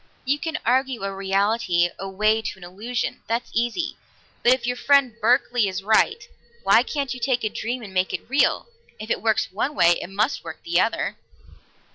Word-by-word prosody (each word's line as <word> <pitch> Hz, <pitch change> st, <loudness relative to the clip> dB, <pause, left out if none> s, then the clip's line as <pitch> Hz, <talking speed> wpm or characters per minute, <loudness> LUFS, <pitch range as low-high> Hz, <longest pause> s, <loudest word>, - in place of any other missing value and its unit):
"You 280 Hz, +3 st, +1 dB
can 325 Hz, -1 st, -3 dB
argue 255 Hz, -1 st, +1 dB
a 195 Hz, 0 st, -2 dB
reality 195 Hz, -2 st, +1 dB
away 210 Hz, +3 st, +1 dB
to 220 Hz, -, -5 dB
an 190 Hz, -, -14 dB
illusion; 215 Hz, +7 st, -4 dB
that's 230 Hz, +2 st, -2 dB
easy. 240 Hz, +9 st, -1 dB, 0.4 s
But 240 Hz, -, +5 dB
if 255 Hz, -2 st, +2 dB
your 245 Hz, 0 st, -1 dB
friend 275 Hz, -2 st, +3 dB
Berkeley 245 Hz, -1 st, +3 dB
is 190 Hz, 0 st, -4 dB
right, 220 Hz, -, +2 dB, 0.4 s
why -, -, +6 dB
can't 280 Hz, -4 st, -3 dB
you 250 Hz, -, -8 dB
take 245 Hz, 0 st, 0 dB
a 215 Hz, -, +1 dB
dream 240 Hz, +3 st, -4 dB
and 200 Hz, -3 st, -10 dB
make 185 Hz, 0 st, +1 dB
it -, -, -5 dB
real? 275 Hz, -, +2 dB, 0.3 s
If 215 Hz, +1 st, -6 dB
it -, -, 0 dB
works 220 Hz, -2 st, +1 dB
one 250 Hz, +10 st, -2 dB
way, 170 Hz, -6 st, +4 dB
it -, -, -7 dB
must 210 Hz, +7 st, -1 dB
work -, -, -9 dB
the 340 Hz, -, +1 dB
other." -, -, -1 dB
230 Hz, 190 wpm, -23 LUFS, 195-255 Hz, 0.4 s, why